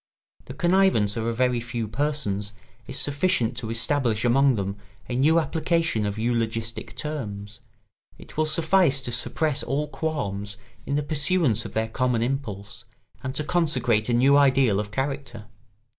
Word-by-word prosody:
The - - -9
connivance 175 - +3
of 115 0 -2
a - - +1
very 125 +1 +1
few 115 -1 -4
persons 105 -5 -2 0.3
is 135 - -4
sufficient 140 -6 +1
to 115 -3 -4
establish 115 -1 0
among 135 +2 +4
them 100 -1 -3 0.3
a 125 - -3
new 155 +6 +4
application 160 -7 0
of 100 +1 -4
eulogistic 115 -1 -2
terms; 105 -9 -5 0.6
it - - -13
will 155 0 +1
suffice 160 -2 +3
to 125 - -5
suppress 145 +4 -1
all 145 +4 -1
qualms 105 -11 -3 0.3
in 140 - 0
the 145 - 0
pursuance 145 - +1
of - - -7
their 110 0 0
common 120 0 0
impulse 110 -7 -4 0.4
and 130 +1 -5
to 150 - -1
consecrate 130 -10 +1
a - - +2
new 135 +4 +5
ideal 130 -7 +4
of 105 -1 -3
character. 135 -2 -4
125 Hz, 155 wpm, -25 LUFS, 110-145 Hz, 0.6 s, new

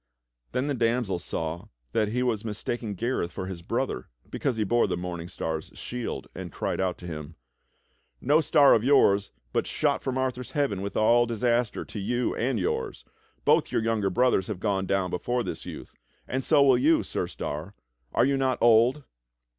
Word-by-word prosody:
Then 130 - 0
the 145 - 0
damsel 115 -6 0
saw 85 -1 -4 0.2
that 110 -1 +1
he 125 +4 -1
was 115 -4 0
mistaking 110 0 -4
Gareth 115 -5 -1
for 95 - -5
his 95 -2 -6
brother - - -2 0.2
because 130 -5 -1
he 110 - +1
bore 120 +4 +2
the - - -2
Morning 90 -1 -5
Star's 80 -2 -4
shield, 125 -1 -5
and - - -7
cried - - -2
out 95 -1 -1
to 90 - -11
him: 80 -2 -7 0.8
"No 150 +4 +3
star 145 -3 +6
of 110 - +3
yours, 100 -7 +4 0.2
but - - 0
shot - - 0
from 130 -1 -2
Arthur's 125 -1 -2
heaven 140 -10 0
wdth 100 +1 -5
all 120 +2 +4
disaster 120 0 0
to 105 - -7
you 120 +5 0
and 120 -1 0
yours! 90 -7 -2 0.4
Both - - +3
your 110 - +1
younger 110 -3 +1
brothers 120 -2 +2
have 105 -4 -4
gone 95 -2 0
down 95 -2 0
before 120 +7 -1
this - - -6
youth; - - -8 0.3
and 130 +1 -2
so 140 - +5
will 130 -3 +5
you. 155 +5 +4
Sir - - -3
Star; 80 +8 -5 0.4
are - - +3
you 140 0 +2
not 130 -1 +1
old?" 120 +5 +4
115 Hz, 185 wpm, -27 LUFS, 95-125 Hz, 0.8 s, star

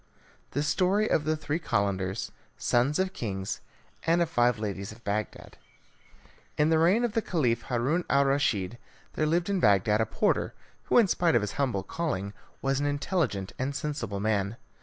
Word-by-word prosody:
The 145 - +2
Story 195 +6 +2
of 150 - +1
the 155 0 +1
Three 155 +1 -2
Calenders, 100 - -1 0.3
Sons 125 +5 +2
of 190 0 0
Kings, 95 -4 -4 0.4
and 165 +1 +2
of 170 -2 +1
Five 120 -4 +3
Ladies 100 -2 -4
of 115 +2 -14
Bagdad 105 +1 -4 1.0
In 150 +2 +3
the 160 - +4
reign 185 +9 +4
of 235 -3 0
the 225 - +1
Caliph 125 - 0
Haroun 135 +8 +1
al 140 0 +4
Raschid, 120 -6 0 0.3
there 155 - 0
lived 170 +2 +1
at 195 - +1
Bagdad 105 - +4
a 110 - +1
porter - - 0 0.3
who, - - +3
in 230 -4 +6
spite 175 -5 +2
of 120 - +4
his 105 - -2
humble 125 -9 -1
calling, 100 - -3 0.3
was 135 0 +1
an 145 - 0
intelligent 145 - -1
and 135 +2 -2
sensible 120 -10 -3
man. 105 +1 0
135 Hz, 175 wpm, -28 LUFS, 105-160 Hz, 1.0 s, in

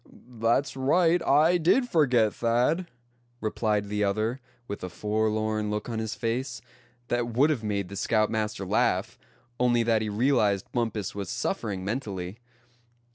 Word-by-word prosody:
"That's 115 +6 +1
right, 165 +6 +3
I 160 +5 +4
did 230 +10 +3
forget, 125 - +3
Thad," 125 +10 +1 0.5
replied 105 -2 0
the 105 0 -1
other, 110 +5 0 0.3
with 100 - -6
a 90 - -4
forlorn 110 +2 -1
look 105 +2 -3
on 115 -1 -2
his 110 -1 -3
face, 120 +1 -2 0.5
that 120 -1 0
would 130 +7 +3
have 125 -7 -2
made 100 -3 -1
the 100 - -8
scoutmaster 110 -1 0
laugh, - - 0 0.4
only 120 -1 +3
that 115 -1 +2
he 110 - -2
realized 105 -3 +1
Bumpus 110 -5 -2
was 100 -1 -5
suffering 115 - -3
mentally. 100 -4 -4
110 Hz, 140 wpm, -27 LUFS, 105-130 Hz, 0.5 s, I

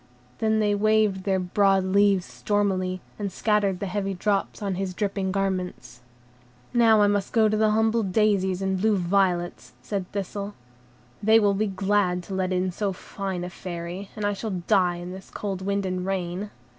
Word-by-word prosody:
Then 220 0 +2
they 210 -1 +2
waved 210 -2 +2
their 195 -1 +2
broad 195 +1 +2
leaves 195 -1 +3
stormily, 185 -3 -1 0.2
and 200 -2 -2
scattered 200 -2 +1
the - - -3
heavy 195 0 -2
drops 200 +2 -1
on 200 -2 -2
his 185 0 -3
dripping 195 -2 -1
garments. 185 -9 -3 0.7
"Now 225 -3 +5
must 205 -1 0
I - - -12
go 220 -1 +5
to 215 - +1
the 215 0 +3
humble 220 +2 +2
daisies 195 -2 +1
and 190 -1 0
blue 215 -1 +3
violets," 175 -1 0
said 195 -3 -4
Thistle, 200 +1 -4 0.7
"they 220 +2 +6
will 205 -2 +3
be 210 +2 0
glad 190 -2 +1
to 195 - -8
let 190 -1 -1
in 185 0 0
so 195 +2 -2
fine 190 -1 -5
a 180 - -4
Fairy, 175 +2 -6
and 210 - -3
I 205 - +1
shall 195 -3 -4
die 185 -4 +3
in 175 +1 -7
this 190 +1 -10
cold 195 -3 -4
wind 200 +1 -1
and 185 -1 -2
rain." 190 +1 -3
195 Hz, 180 wpm, -25 LUFS, 185-205 Hz, 0.7 s, they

